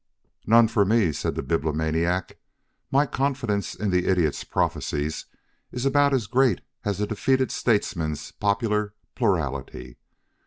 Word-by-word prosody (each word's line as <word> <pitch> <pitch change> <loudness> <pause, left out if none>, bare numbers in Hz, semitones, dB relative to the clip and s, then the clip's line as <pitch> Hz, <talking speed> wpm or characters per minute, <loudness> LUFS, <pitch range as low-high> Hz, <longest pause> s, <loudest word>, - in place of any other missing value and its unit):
"None 115 +1 +6
for 110 -2 +2
me," 100 -4 +2
said 75 - -3
the - - -3
Bibliomaniac. 80 +4 -1 0.5
"My 140 +2 +3
confidence 130 -8 -1
in 105 -2 -2
the 90 0 +1
Idiot's 90 -6 +1
prophecies 75 +2 -2 0.4
is 125 +1 -4
about 140 +1 +3
as 130 -5 +1
great 125 -2 +2 0.2
as 100 -2 -2
a 105 - +1
defeated 130 +5 0
statesman's 85 -9 -1
popular 105 0 -1 0.2
plurality. 70 - -2
105 Hz, 125 wpm, -25 LUFS, 80-120 Hz, 0.5 s, None